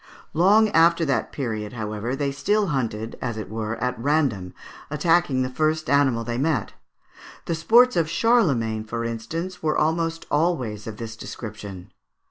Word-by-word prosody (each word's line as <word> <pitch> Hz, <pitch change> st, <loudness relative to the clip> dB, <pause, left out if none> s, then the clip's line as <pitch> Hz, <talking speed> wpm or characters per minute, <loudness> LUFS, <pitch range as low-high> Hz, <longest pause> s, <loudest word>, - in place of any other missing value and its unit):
Long 205 Hz, +7 st, +5 dB
after 170 Hz, -2 st, +4 dB
that 135 Hz, -3 st, 0 dB
period, 110 Hz, -5 st, -4 dB
however, 110 Hz, +2 st, -3 dB
they 140 Hz, 0 st, -1 dB
still 200 Hz, +9 st, +1 dB
hunted, 115 Hz, -6 st, -3 dB
as 120 Hz, -3 st, -3 dB
it 110 Hz, -, -6 dB
were, 110 Hz, 0 st, -3 dB
at 125 Hz, 0 st, -3 dB
random, 130 Hz, -, 0 dB, 0.3 s
attacking 150 Hz, -3 st, +2 dB
the -, -, -1 dB
first 155 Hz, +2 st, 0 dB
animal 135 Hz, -5 st, +3 dB
they 120 Hz, +1 st, -3 dB
met. 140 Hz, -7 st, 0 dB, 0.7 s
The 170 Hz, -, -1 dB
sports 235 Hz, +10 st, +5 dB
of 165 Hz, -2 st, +1 dB
Charlemagne, 140 Hz, -, +2 dB
for 115 Hz, +1 st, -4 dB
instance, 165 Hz, +11 st, -4 dB
were 155 Hz, -1 st, 0 dB
almost 165 Hz, +1 st, 0 dB
always 130 Hz, -10 st, 0 dB
of 110 Hz, -1 st, -6 dB
this 110 Hz, -1 st, -6 dB
description. 105 Hz, -5 st, -8 dB
135 Hz, 150 wpm, -24 LUFS, 110-165 Hz, 0.7 s, Long